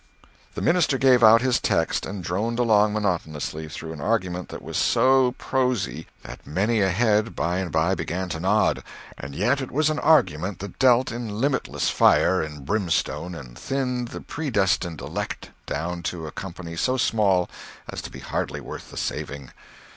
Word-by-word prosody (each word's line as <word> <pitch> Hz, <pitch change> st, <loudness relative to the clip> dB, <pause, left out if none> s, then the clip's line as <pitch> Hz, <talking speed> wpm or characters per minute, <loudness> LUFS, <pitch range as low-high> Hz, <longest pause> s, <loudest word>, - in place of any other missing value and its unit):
The -, -, -3 dB
minister 165 Hz, -6 st, +3 dB
gave 130 Hz, -2 st, +5 dB
out 115 Hz, +2 st, +8 dB
his 130 Hz, -2 st, +2 dB
text 80 Hz, -, 0 dB
and 95 Hz, -1 st, -6 dB
droned 105 Hz, +8 st, -1 dB
along 110 Hz, -3 st, +4 dB
monotonously 80 Hz, -6 st, -2 dB
through 80 Hz, 0 st, -7 dB
an 75 Hz, -, -8 dB
argument 90 Hz, -3 st, -1 dB
that -, -, -8 dB
was -, -, -7 dB
so 130 Hz, -1 st, +4 dB
prosy 125 Hz, -, -1 dB, 0.2 s
that -, -, -9 dB
many 105 Hz, +8 st, +1 dB
a 95 Hz, -, +3 dB
head 110 Hz, +3 st, +2 dB
by 85 Hz, +2 st, 0 dB
and 90 Hz, -3 st, -3 dB
by 80 Hz, +4 st, +2 dB
began 95 Hz, 0 st, -3 dB
to -, -, -4 dB
nod—and 70 Hz, +1 st, -1 dB
yet 125 Hz, -, +1 dB
it 130 Hz, -, -5 dB
was 155 Hz, +2 st, +2 dB
an 155 Hz, -, -2 dB
argument 95 Hz, -, +3 dB
that 100 Hz, -1 st, -9 dB
dealt 125 Hz, -1 st, +4 dB
in 115 Hz, -3 st, -5 dB
limitless 135 Hz, +1 st, 0 dB
fire 95 Hz, -, +4 dB
and 75 Hz, -3 st, -7 dB
brimstone 90 Hz, -4 st, -1 dB
and 65 Hz, -7 st, -10 dB
thinned 125 Hz, -3 st, -2 dB
the -, -, -8 dB
predestined 95 Hz, -, -1 dB
elect -, -, -5 dB, 0.2 s
down 85 Hz, +4 st, -3 dB
to 85 Hz, -1 st, -4 dB
a 75 Hz, -, -6 dB
company 85 Hz, -2 st, -7 dB
so 130 Hz, +10 st, +1 dB
small 100 Hz, -7 st, +2 dB, 0.4 s
as -, -, -5 dB
to -, -, -7 dB
be -, -, -10 dB
hardly -, -, -3 dB
worth -, -, -9 dB
the -, -, -11 dB
saving. 70 Hz, -3 st, -4 dB
100 Hz, 170 wpm, -24 LUFS, 85-125 Hz, 0.4 s, out